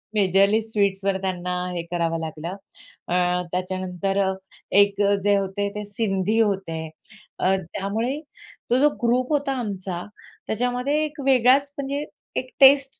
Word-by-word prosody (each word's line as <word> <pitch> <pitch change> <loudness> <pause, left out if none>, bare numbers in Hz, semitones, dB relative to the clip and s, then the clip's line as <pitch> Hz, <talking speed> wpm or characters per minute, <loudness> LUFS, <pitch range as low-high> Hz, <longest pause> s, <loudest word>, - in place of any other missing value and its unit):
Majorly 200 +1 +4
स्वीट्सवर 200 -3 0
त्यांना 180 -2 -2 0.2
हे 170 - -2
करावं 165 -1 0
लागलं, 160 +3 -5 0.5
अ, 175 - 0 0.4
त्याच्यानंतर 185 +1 -2 0.6
एक 200 0 +2 0.2
जे 205 0 +4
होते 195 +1 -1
ते 210 - -3
सिंधी 205 0 0
होते. 195 -7 0 0.6
अ, 190 +1 +3 0.2
त्यामुळे 225 +8 -2 0.5
तो 245 - +3
जो 295 +2 +5
ग्रुप 250 +4 +2
होता 285 -2 +1
आमचा 190 -5 -4 0.4
त्याच्यामध्ये 250 +6 0
एक 295 -1 -8
वेगळाच 270 +2 +4
म्हणजे, 280 +1 -3 0.3
एक 255 0 -2
टेस्ट 275 0 +6
205 Hz, 125 wpm, -24 LUFS, 190-250 Hz, 0.6 s, टेस्ट